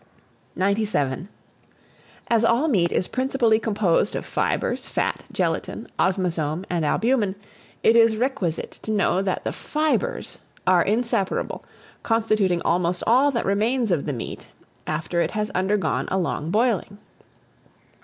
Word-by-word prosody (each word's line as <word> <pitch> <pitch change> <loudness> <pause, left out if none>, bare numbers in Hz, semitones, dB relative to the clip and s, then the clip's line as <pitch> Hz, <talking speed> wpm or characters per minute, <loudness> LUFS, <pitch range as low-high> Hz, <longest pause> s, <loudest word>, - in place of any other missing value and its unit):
97. 190 -6 0 1.0
AS 230 -1 +2
ALL 235 +7 +3
MEAT 180 - +2
is 185 - 0
principally 255 -4 +2
composed 205 -3 +1
of - - -4
fibres, - - -1
fat, - - -2
gelatine, - - -2
osmazome, 175 -3 0
and 170 -2 0
albumen, 215 - +1 0.5
it 225 - +5
is 230 -1 +5
requisite 215 - -2
to - - -8
know 200 -3 +2
that 190 -2 -2
the - - -2
FIBRES 310 +11 -2 0.3
are 180 -1 +5
inseparable, 215 -2 -1 0.4
constituting 215 -6 +1
almost 175 +1 +1
all 260 +5 +5
that 240 -4 -1
remains 220 +3 +1
of 160 -4 0
the 145 - -1
meat 120 - -7 0.4
after 160 +2 -1
it 165 - +1
has 210 0 -2
undergone 195 +2 0
a 190 - 0
long 165 -3 -2
boiling. 215 -1 +1
200 Hz, 130 wpm, -23 LUFS, 175-230 Hz, 1.0 s, it